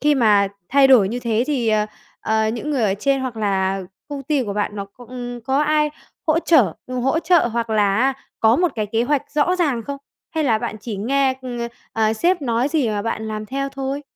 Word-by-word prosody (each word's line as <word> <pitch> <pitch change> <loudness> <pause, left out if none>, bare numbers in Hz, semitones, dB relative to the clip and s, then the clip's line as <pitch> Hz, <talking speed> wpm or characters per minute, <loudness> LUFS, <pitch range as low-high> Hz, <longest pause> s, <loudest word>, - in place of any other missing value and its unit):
khi 295 0 +3
mà 210 -6 +4 0.2
thay 275 +1 +5
đổi 230 -8 +6
như 240 +3 -3
thế 230 0 0
thì, 255 -7 0
ờ, 215 -1 +2 0.3
ờ, 220 0 +1
những 240 +7 -3
người 270 -5 0
ở 200 -3 +2
trên 270 +6 0
hoặc 255 -3 -4
là 195 -2 0 0.3
công 285 -1 -5
ty 280 -1 0
của 205 - -3
bạn 205 0 -2
nó 200 - -3
c 200 - -24
ừm, 245 -1 -6
có 270 +6 +1
ai 300 0 +2 0.4
hỗ 315 +1 +3
trở 255 - +4
ừm, 255 0 -3
hỗ 270 +6 +1
trợ 340 -5 +3
hoặc 230 0 -2
là 205 -2 +2
á 265 +3 +3 0.3
có 225 +2 +5
một 350 -4 +1
cái 215 -2 -2
kế 225 +3 0
hoạch 285 +2 +1
rõ 320 +5 +2
ràng 285 -10 0
không? 280 +5 -5 0.3
Hay 320 -1 -1
là 225 -5 +3
bạn 215 - -4
chỉ 215 -3 -5
nghe, 265 +5 +1
ừm, 245 -2 -5 0.3
ờ, 220 -1 +2
sếp 345 +7 +1
nói 240 +2 +1
gì 295 -6 +1
mà 205 -1 -1
bạn 220 -1 -3
làm 215 0 -4
theo 275 +2 -2
thôi? 275 +1 -4
245 Hz, 235 wpm, -21 LUFS, 220-280 Hz, 0.4 s, đổi